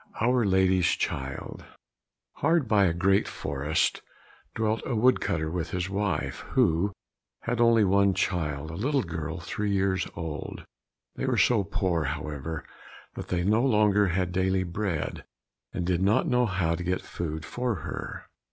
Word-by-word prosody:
3 110 - +1
Our 125 -3 +3
Lady's 95 -2 +3
Child 65 0 -3 0.7
Hard 160 -6 +2
by 105 -3 +4
a 90 - +3
great 95 +3 +2
forest 70 +3 -1 0.5
dwelt 110 0 0
a 125 - -2
wood 125 +4 +4
cutter 80 -1 -1
with 85 -1 -3
his 90 +1 -3
wife, 100 -5 -1
who 85 +5 +3 0.5
had 120 0 -2
an 120 - +6
only 100 -4 +4
child, 80 -5 -1
a - - -8
little 135 - 0
girl 80 -1 -4
three 95 +6 -3
years 95 -1 +1
old. 80 -3 -6 0.5
They - - -2
were - - +1
so 115 -5 +4
poor, 95 -5 0
however, 75 +1 -4 0.5
that - - -7
they 90 -1 0
no 105 +5 +3
longer 105 -5 +4
had 90 0 0
daily 95 +1 +1
bread, 85 -3 -3 0.5
and 90 - -3
did 90 0 +1
not 105 - +3
know 125 -3 +3
how 90 -4 0
to 90 - -3
get 90 +1 -1
food 80 -2 -5
for 125 +3 -2
her. - - -6
95 Hz, 160 wpm, -27 LUFS, 80-105 Hz, 0.7 s, an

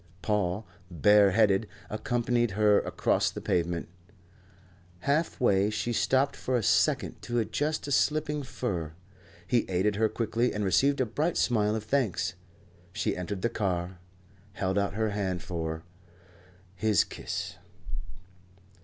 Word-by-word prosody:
Paul, 105 -1 0 0.2
bare 100 +4 +5
headed, 105 +1 +3 0.2
accompanied 120 0 0
her 105 -1 +5
across - - +1
the - - -7
pavement. 85 0 -1 1.1
Half 150 - 0
way 100 -4 +3
she 120 +2 -2
stopped 135 +4 +2
for 130 -1 -1
a 115 - -1
second 85 - +2
to 120 0 -3
adjust 145 +7 -1
a - - -4
slipping 150 +1 +1
fur. 90 - -4 0.5
He 120 +6 +3
aided 95 +3 +1
her 110 0 +3
quickly 115 +2 0
and 105 -1 -1
received 140 +8 +3
a - - +2
bright 150 +10 -1
smile 105 -3 +2
of 110 - -3
thanks. 110 -5 0 0.6
She - - -1
entered 90 +2 -4
the 120 - +2
car 90 -4 -2 0.5
held 95 +1 0
out 100 -1 -1
her 110 -1 0
hand 95 -4 -2
for, 80 -2 -4 0.9
his 105 +1 +3
kiss. - - -5
105 Hz, 135 wpm, -28 LUFS, 95-120 Hz, 1.1 s, bare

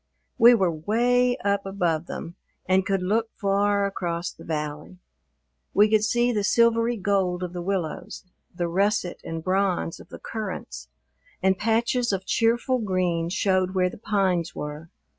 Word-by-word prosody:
We 240 +1 +8
were 190 -6 +2
'way 245 +9 +1
up 200 0 +1
above 175 -5 -1
them 165 - -6 0.3
and 185 +1 +2
could 195 -2 0
look 225 +4 0
far 200 0 +2
across 175 -3 -3
the - - -15
valley. 150 +2 -5 0.8
We 210 +1 +5
could 215 -1 +4
see 240 +3 +2
the 210 -3 -1
silvery 235 +2 +3
gold 185 -3 0
of 180 -1 -5
the 175 - -4
willows, 180 -2 -4 0.3
the 175 0 -2
russet 195 +1 0
and 165 -1 -5
bronze 185 -2 0
of - - -14
the - - -9
currants, 65 - -6 0.5
and 190 0 +4
patches 230 +4 +1
of 190 -1 -3
cheerful 240 +4 +1
green 180 -5 0
showed 185 0 +1
where 180 -1 +2
the - - -12
pines 190 -6 0
were. 150 +2 -6
195 Hz, 155 wpm, -25 LUFS, 175-215 Hz, 0.8 s, We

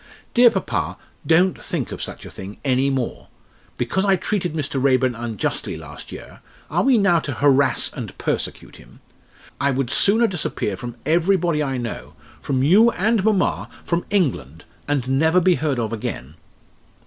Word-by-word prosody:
Dear 240 0 +7
papa, - - -2 0.3
don't 175 +3 +3
think - - -3
of - - -6
such - - -6
a - - -9
thing 95 +2 -8
any 135 +1 +2
more. 130 -3 -3 0.5
Because 125 +11 0
I 195 -1 +4
treated 180 -3 -2
Mr. 145 -3 -2
Raeburn 130 -2 +3
unjustly 115 -3 -3
last - - -10
year, - - -10 0.3
are - - +2
we 265 -2 +4
now 185 -5 +4
to 145 -3 -4
harass 140 +1 +2
and - - -7
persecute - - -4
him? - - -18 0.6
I 140 +1 +2
would 135 -2 -1
sooner 220 +4 +4
disappear 155 - -2
from 120 +5 -7
everybody 170 0 +2
I 135 -3 -1
know 120 -2 -6 0.3
from 130 -2 0
you 200 +11 +6
and 220 -1 +1
mamma, 210 -3 +1 0.2
from 170 0 -1
England 85 - -1 0.2
and 140 -4 0
never 160 +7 +3
be 185 +1 +4
heard 150 -5 -1
of 115 -1 -2
again." 105 - -5
145 Hz, 160 wpm, -21 LUFS, 125-185 Hz, 0.6 s, Dear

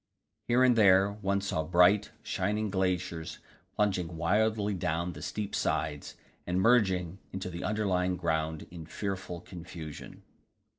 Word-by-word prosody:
Here 120 +2 +4
and 125 -2 +5
there 100 -2 +5
one 100 -1 -1
saw 95 -5 -1
bright, 90 +5 +4
shining 105 +2 -1
glaciers 90 -4 -1 0.4
plunging 90 -5 0
wildly 105 +4 +1
down 85 -1 -1
the 75 - -9
steep 105 +5 -4
sides, 75 -1 -1 0.3
and 90 +1 +1
merging 95 -5 +3
into 95 -1 -5
the 85 +1 -6
underlying 95 -4 0
ground 80 -2 -1
in 85 -3 -9
fearful 95 -2 -4
confusion. 80 -3 -9
95 Hz, 130 wpm, -30 LUFS, 85-100 Hz, 0.4 s, and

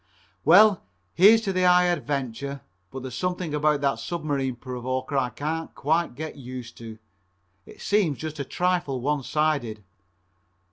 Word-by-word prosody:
Well, 200 +5 +6 0.3
here's 215 - +7
to 195 -4 -2
the 185 - 0
High 180 0 +6
Adventure, 140 -5 -2 0.3
but 130 -1 -8
there's 130 -2 -6
something 180 +2 -3
about 150 -1 +2
that 140 -1 0
Submarine 145 -6 -2
Provoker 130 +2 -4
I 130 -2 +1
can't 155 +6 -4
quite 160 -1 0
get 155 +3 -6
used 125 -2 -8
to. 115 -1 -9 0.7
It - - -14
seems 195 -9 +1
just 155 -1 -6
a - - -1
trifle 175 -3 -1
one 145 +3 0
sided. 140 -7 -1
145 Hz, 145 wpm, -25 LUFS, 130-170 Hz, 0.7 s, here's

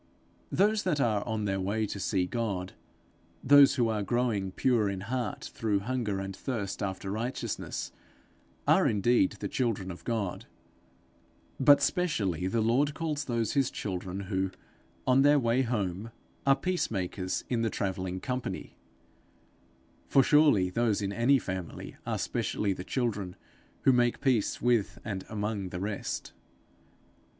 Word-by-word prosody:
Those 210 +2 +3
that 175 -7 0
are 110 -6 +2
on 110 -2 -1
their 95 -1 0
way 105 +4 0
to 100 - -5
see 95 -1 +1
God, 95 -3 -3 0.7
those 140 0 +7
who 120 -4 +2
are 110 -2 0
growing 110 -4 0
pure 115 0 +2
in 95 -1 -4
heart 120 0 -3
through 105 -3 0
hunger 110 -3 -2
and 95 0 -5
thirst 110 -6 -4
after 95 0 -3
righteousness, 115 +5 -3 0.8
are - - +5
indeed 105 -1 +3
the 105 0 -5
children 105 -6 -1
of 90 - -10
God; 110 -6 -3 1.1
but 145 +1 +6
specially 100 - 0
the 110 +4 0
Lord 130 +6 +2
calls 150 -3 -2
those 115 -4 -1
his 135 -2 +2
children 95 -1 -4
who, 95 -1 -1 0.6
on 130 +1 +5
their 145 +1 +6
way 120 -1 +2
home, 105 -4 -2 0.4
are 135 - +7
peace 180 +4 -1
makers 95 -2 -2
in 120 -2 0
the 115 - +1
travelling 95 -2 -3
company; 125 +3 -4 1.3
for, 135 - +5
surely, 145 -12 +4
those 110 -1 +1
in 100 0 -2
any 120 +6 +4
family 95 -8 -6
are - - 0
specially 100 -2 -1
the 90 - -7
children, 100 -2 -2 0.5
who 135 - +6
make 120 -1 +2
peace 130 -6 +1
with 120 -4 +1
and 95 -3 -4
among 105 -2 -3
the 90 - -5
rest. 100 +1 -4
110 Hz, 145 wpm, -29 LUFS, 95-125 Hz, 1.3 s, those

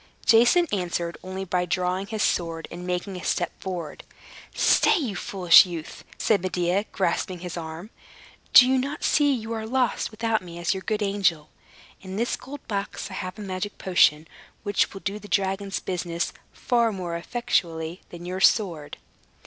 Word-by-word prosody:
Jason 240 +10 +5
answered 175 -3 -2
only 190 +1 -5
by 180 -1 0
drawing 180 +2 -1
his 215 -1 -2
sword, 165 -2 -1
and 175 +1 -7
making 180 +2 -3
a 180 - -8
step - - 0
forward. 175 -5 -5 0.5
"Stay, 315 - +3
foolish 180 -2 +6
youth," 170 -4 -7
said 215 -4 +2
Medea, 185 +2 0
grasping 185 -1 -1
his 180 -1 -6
arm. 165 +5 -7 0.6
"Do 250 - +9
not 280 +3 -3
you - - -8
see 290 -1 +3
you 230 -3 -2
are 220 -1 -4
lost, 255 +1 0
without 225 0 -1
me 170 -2 -10
as 175 +2 0
your 190 - -5
good 215 +2 -1
angel? 185 -7 0 0.5
In 190 -1 -7
this 235 +4 0
gold 280 +1 -11
box 200 -1 -4
I - - -7
have 185 0 -5
a - - -8
magic 195 +1 -4
potion, 160 -4 +3 0.4
which 205 -1 +1
will 195 - -9
do 200 +2 -3
the 205 - -12
dragon's 195 0 -1
business 175 -2 -3 0.2
far 235 -2 +1
more 180 -4 -4
effectually 170 -4 -2
than 175 0 -10
your 185 +1 -4
sword." 175 -7 +2
190 Hz, 165 wpm, -25 LUFS, 175-215 Hz, 0.6 s, Do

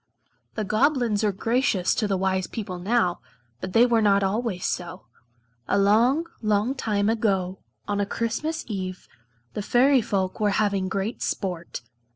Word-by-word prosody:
The 215 - -1
Goblins 230 -1 +1
are 210 - +3
gracious 225 -2 +1
to 215 - 0
the 195 -1 0
wise 190 0 0
people 195 -6 -5
now, 185 -2 +1 0.4
but 185 +5 -6
they 235 +2 +6
were 235 -2 +3
not 200 -1 +3
always 195 -1 -1
so. 175 -7 -4 0.6
A - - +2
long, 230 +10 +3 0.2
long 215 +3 +1
time 210 -6 -1
ago, 195 -5 0 0.3
on 205 0 -1
a 200 - -1
Christmas 230 +10 -2
eve, 185 -4 -5 0.5
the - - -3
Fairy 255 +5 +4
folk 190 -3 -2
were 210 -1 +2
having 200 -3 +1
great 200 +5 -3
sport. 180 -4 -3
205 Hz, 155 wpm, -25 LUFS, 190-230 Hz, 0.6 s, they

